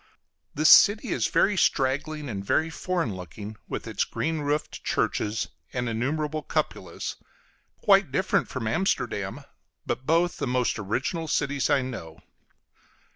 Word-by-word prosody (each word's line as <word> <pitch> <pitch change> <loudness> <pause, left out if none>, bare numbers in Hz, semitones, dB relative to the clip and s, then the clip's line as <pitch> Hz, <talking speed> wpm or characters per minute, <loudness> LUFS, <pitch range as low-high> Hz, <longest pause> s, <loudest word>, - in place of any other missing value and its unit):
This 155 0 +4
city 210 +1 +7
is - - +1
very 205 - +3
straggling, 145 -1 +1
and 100 -5 -4
very 160 +10 +1
foreign 170 - -2
looking, 100 +4 -8
with - - -4
its - - 0
green 160 0 -2
roofed 145 +1 -2
churches 110 +1 -1 0.2
and 125 -1 -1
innumerable 150 +7 -1
cupolas; - - -3 0.7
quite 195 - +5
different 190 +7 +1
from 130 -3 -4
Amsterdam, 110 - -1 0.4
but 130 - -3
both 170 +2 +2
the - - -2
most 125 -2 0
original 135 - -2
cities 140 -2 0
I 140 -2 +3
know. 85 -11 -7
140 Hz, 130 wpm, -26 LUFS, 115-160 Hz, 0.7 s, city